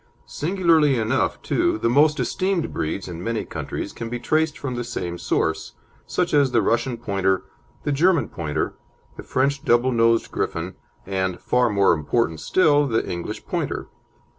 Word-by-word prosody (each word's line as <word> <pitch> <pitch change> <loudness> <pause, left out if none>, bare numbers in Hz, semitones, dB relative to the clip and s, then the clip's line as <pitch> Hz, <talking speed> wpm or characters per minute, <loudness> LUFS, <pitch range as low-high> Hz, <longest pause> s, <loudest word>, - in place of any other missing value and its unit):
Singularly 160 -4 +2
enough, 115 +4 0
too, 345 -1 +1
the - - 0
most 145 +5 +4
esteemed 185 -3 -1
breeds 80 +6 -3
in 85 -1 -7
many 115 +1 -2
countries - - -5
can 115 -1 -6
be 120 - -3
traced 155 +5 0
from 130 -3 -4
the 120 0 -3
same 90 -7 -4
source, 80 - -1 0.3
such 180 -3 -1
as 140 -2 +4
the 120 -2 +3
Russian 120 +3 0
Pointer, 95 -4 0 0.4
the 145 - -1
German 155 - +3
Pointer, 75 -3 -3 0.4
the - - -8
French 140 +2 0
double 120 +2 +3
nosed 115 -1 +2
Griffon, - - -3 0.3
and, 95 -2 -2
far 125 -1 +2
more 100 -3 +4
important 80 +2 0
still, 145 - +3
the 115 -3 0
English 85 -1 -5
Pointer. - - -3
120 Hz, 160 wpm, -23 LUFS, 100-150 Hz, 0.4 s, most